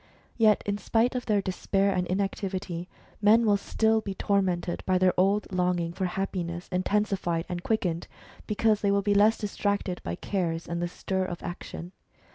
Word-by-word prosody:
Yet 215 Hz, -3 st, +4 dB
in 205 Hz, 0 st, -1 dB
spite 230 Hz, +3 st, +2 dB
of 250 Hz, -1 st, -4 dB
their 205 Hz, -3 st, +2 dB
despair 195 Hz, +1 st, +1 dB
and 180 Hz, -1 st, -1 dB
inactivity, 190 Hz, -2 st, -2 dB, 0.3 s
men 220 Hz, +3 st, +5 dB
will 205 Hz, -2 st, +4 dB
still 220 Hz, +2 st, +1 dB
be 200 Hz, -2 st, -5 dB
tormented 185 Hz, -4 st, 0 dB
by 185 Hz, -1 st, +3 dB
their 185 Hz, 0 st, +3 dB
old 195 Hz, +3 st, +2 dB
longing 180 Hz, -2 st, 0 dB
for 190 Hz, -, -2 dB
happiness 180 Hz, -2 st, -3 dB
intensified 185 Hz, -3 st, 0 dB
and 175 Hz, -1 st, -4 dB
quickened, 180 Hz, -5 st, -1 dB, 0.4 s
because 215 Hz, 0 st, +2 dB
they 200 Hz, -, +2 dB
will 200 Hz, 0 st, +2 dB
be 205 Hz, 0 st, +2 dB
less 210 Hz, +2 st, +5 dB
distracted 200 Hz, -3 st, -2 dB
by 85 Hz, -, -3 dB
cares, 170 Hz, -, -2 dB
and 170 Hz, 0 st, -3 dB
the 175 Hz, -, 0 dB
stir 190 Hz, +2 st, -2 dB
of 175 Hz, -2 st, -6 dB
action. 175 Hz, 0 st, -7 dB
190 Hz, 170 wpm, -27 LUFS, 180-205 Hz, 0.4 s, men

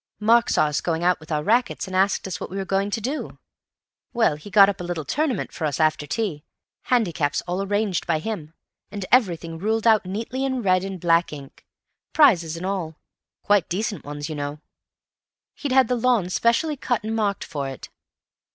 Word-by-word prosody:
Mark 230 Hz, +2 st, +4 dB
saw -, -, +3 dB
us 150 Hz, 0 st, -1 dB
going 165 Hz, -1 st, -1 dB
out 180 Hz, 0 st, +3 dB
with 155 Hz, 0 st, -13 dB
our 150 Hz, -1 st, 0 dB
rackets 235 Hz, +5 st, +1 dB
and 190 Hz, -1 st, -6 dB
asked 195 Hz, +2 st, +2 dB
us 185 Hz, -, -5 dB
what -, -, -6 dB
we 195 Hz, -, -6 dB
were 195 Hz, -, -3 dB
going 195 Hz, +1 st, 0 dB
to 215 Hz, -, -2 dB
do. 265 Hz, +8 st, -4 dB, 0.8 s
Well, 230 Hz, -, +2 dB
he'd 150 Hz, +7 st, -11 dB
got 195 Hz, 0 st, +8 dB
up 200 Hz, -2 st, -2 dB
a -, -, -4 dB
little 175 Hz, -3 st, -4 dB
tournament 280 Hz, -, -1 dB
for 160 Hz, -, -4 dB
us 145 Hz, -1 st, -2 dB
after 155 Hz, -2 st, +1 dB
tea—handicaps 175 Hz, -, -2 dB
all 180 Hz, +2 st, -3 dB
arranged 205 Hz, -1 st, -1 dB
by 165 Hz, -2 st, +2 dB
him, 160 Hz, -3 st, -5 dB, 0.3 s
and 200 Hz, -2 st, -5 dB
everything 170 Hz, -9 st, +2 dB
ruled 220 Hz, +4 st, -1 dB
out 220 Hz, -2 st, +5 dB
neatly 225 Hz, +8 st, -4 dB
in 260 Hz, -3 st, -1 dB
red 185 Hz, -1 st, +3 dB
and 195 Hz, -1 st, -5 dB
black 170 Hz, 0 st, +2 dB
ink—prizes 165 Hz, -, 0 dB
and 175 Hz, -, -5 dB
all—quite 190 Hz, +1 st, -2 dB
decent 200 Hz, 0 st, -2 dB
ones, 145 Hz, 0 st, -6 dB
you 160 Hz, -, -5 dB
know. 145 Hz, 0 st, -5 dB, 0.9 s
He'd 285 Hz, -, -5 dB
had 260 Hz, -2 st, +5 dB
the 250 Hz, -, 0 dB
lawn 235 Hz, -6 st, +1 dB
specially 280 Hz, -, +1 dB
cut 245 Hz, -3 st, -1 dB
and 220 Hz, +1 st, -3 dB
marked 205 Hz, -3 st, 0 dB
for 140 Hz, -4 st, -4 dB
it. 135 Hz, -, -9 dB
190 Hz, 190 wpm, -23 LUFS, 160-225 Hz, 0.9 s, got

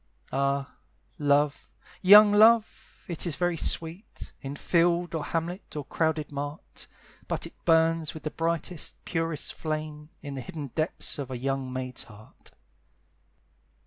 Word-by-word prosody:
Ah, 140 Hz, +1 st, -1 dB, 0.4 s
love! 145 Hz, 0 st, +2 dB, 0.3 s
young 205 Hz, +2 st, +9 dB
love! 220 Hz, +1 st, +3 dB
it 170 Hz, 0 st, -2 dB
is 160 Hz, -, -1 dB
very 175 Hz, -1 st, 0 dB
sweet, 165 Hz, +5 st, -1 dB
In 140 Hz, 0 st, -6 dB
field, 170 Hz, +2 st, +1 dB
or 160 Hz, -2 st, -2 dB
hamlet, 170 Hz, +4 st, -4 dB
or 145 Hz, -2 st, -4 dB
crowded 155 Hz, 0 st, -1 dB
mart; 145 Hz, +2 st, -6 dB, 0.4 s
But -, -, -2 dB
it -, -, -14 dB
burns 165 Hz, -1 st, +3 dB
with 160 Hz, -, -9 dB
the 155 Hz, -, -3 dB
brightest, 165 Hz, 0 st, -2 dB
purest 165 Hz, -3 st, -2 dB
flame 155 Hz, -1 st, -5 dB
In 145 Hz, -2 st, -6 dB
the 135 Hz, -, -5 dB
hidden 150 Hz, -1 st, -7 dB
depths 155 Hz, -1 st, -1 dB
of 135 Hz, -2 st, -4 dB
a 130 Hz, -, -4 dB
young 135 Hz, 0 st, -2 dB
maid's 130 Hz, -1 st, -5 dB
heart. 110 Hz, -1 st, -15 dB
155 Hz, 140 wpm, -27 LUFS, 140-170 Hz, 0.4 s, young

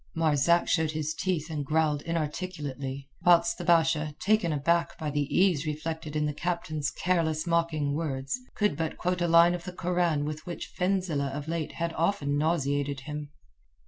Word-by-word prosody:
Marzak 160 Hz, +1 st, +3 dB
showed 160 Hz, -2 st, +1 dB
his 155 Hz, 0 st, -2 dB
teeth 165 Hz, -2 st, -2 dB
and 150 Hz, -2 st, -2 dB
growled 150 Hz, 0 st, +1 dB
inarticulately, 150 Hz, -5 st, -4 dB, 0.2 s
whilst 170 Hz, -1 st, +4 dB
the -, -, -4 dB
Basha, 160 Hz, -3 st, +2 dB
taken 210 Hz, -4 st, +2 dB
aback 170 Hz, +3 st, +1 dB
by 150 Hz, -2 st, -3 dB
the 145 Hz, -1 st, 0 dB
ease 175 Hz, -5 st, +3 dB
reflected 155 Hz, 0 st, -4 dB
in 150 Hz, 0 st, +1 dB
the 150 Hz, -, -1 dB
captain's 155 Hz, -2 st, -2 dB
careless, 165 Hz, -4 st, 0 dB
mocking 165 Hz, -4 st, +1 dB
words, 140 Hz, -, -2 dB, 0.2 s
could 210 Hz, -1 st, +1 dB
but 160 Hz, -1 st, -3 dB
quote 180 Hz, 0 st, -1 dB
a 175 Hz, -, +2 dB
line 170 Hz, +1 st, +6 dB
of 175 Hz, -1 st, -4 dB
the 180 Hz, -, -6 dB
Koran 175 Hz, -4 st, 0 dB
with 155 Hz, +1 st, -5 dB
which 175 Hz, -, -6 dB
Fenzileh 180 Hz, -7 st, 0 dB
of 145 Hz, +2 st, -5 dB
late 165 Hz, -1 st, -3 dB
had 170 Hz, 0 st, -2 dB
often 160 Hz, -4 st, 0 dB
nauseated 145 Hz, -3 st, 0 dB
him. 150 Hz, +1 st, -6 dB
160 Hz, 170 wpm, -28 LUFS, 150-170 Hz, 0.2 s, line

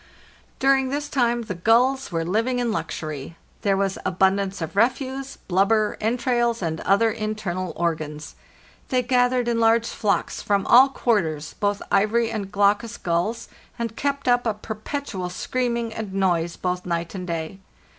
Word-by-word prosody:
During 270 Hz, -1 st, +3 dB
this 290 Hz, +2 st, -2 dB
time 240 Hz, -3 st, +1 dB
the 215 Hz, -, -4 dB
gulls 235 Hz, +8 st, +2 dB
were 165 Hz, -1 st, -1 dB
living 225 Hz, +8 st, 0 dB
in 240 Hz, -2 st, 0 dB
luxury. 155 Hz, -6 st, -5 dB, 0.2 s
There 195 Hz, -2 st, +2 dB
was 195 Hz, -1 st, -1 dB
abundance 195 Hz, +1 st, +1 dB
of 165 Hz, +2 st, -5 dB
refuse, 265 Hz, +4 st, 0 dB
blubber, 205 Hz, +3 st, +1 dB
entrails, 235 Hz, -1 st, +1 dB
and 160 Hz, -1 st, -2 dB
other 220 Hz, +4 st, +3 dB
internal 215 Hz, -5 st, -3 dB
organs. 155 Hz, -3 st, -3 dB, 0.6 s
They 255 Hz, -2 st, +1 dB
gathered 245 Hz, 0 st, +2 dB
in 235 Hz, -1 st, +1 dB
large 230 Hz, 0 st, +4 dB
flocks 205 Hz, -2 st, -1 dB
from 200 Hz, -1 st, +1 dB
all 260 Hz, +3 st, +7 dB
quarters, 165 Hz, -, 0 dB
both 205 Hz, 0 st, 0 dB
ivory 225 Hz, +3 st, +2 dB
and 200 Hz, -3 st, -4 dB
glaucus 205 Hz, +4 st, +2 dB
gulls, 200 Hz, +7 st, -1 dB, 0.3 s
and 230 Hz, -1 st, -3 dB
kept 280 Hz, 0 st, -2 dB
up 245 Hz, -1 st, +3 dB
a 220 Hz, -, 0 dB
perpetual 215 Hz, -2 st, -5 dB
screaming 235 Hz, +3 st, -2 dB
and 220 Hz, -3 st, -5 dB
noise 175 Hz, -3 st, +1 dB
both 180 Hz, 0 st, -2 dB
night 170 Hz, -1 st, -3 dB
and 185 Hz, -2 st, -6 dB
day. 165 Hz, +2 st, -4 dB
215 Hz, 150 wpm, -23 LUFS, 185-240 Hz, 0.6 s, all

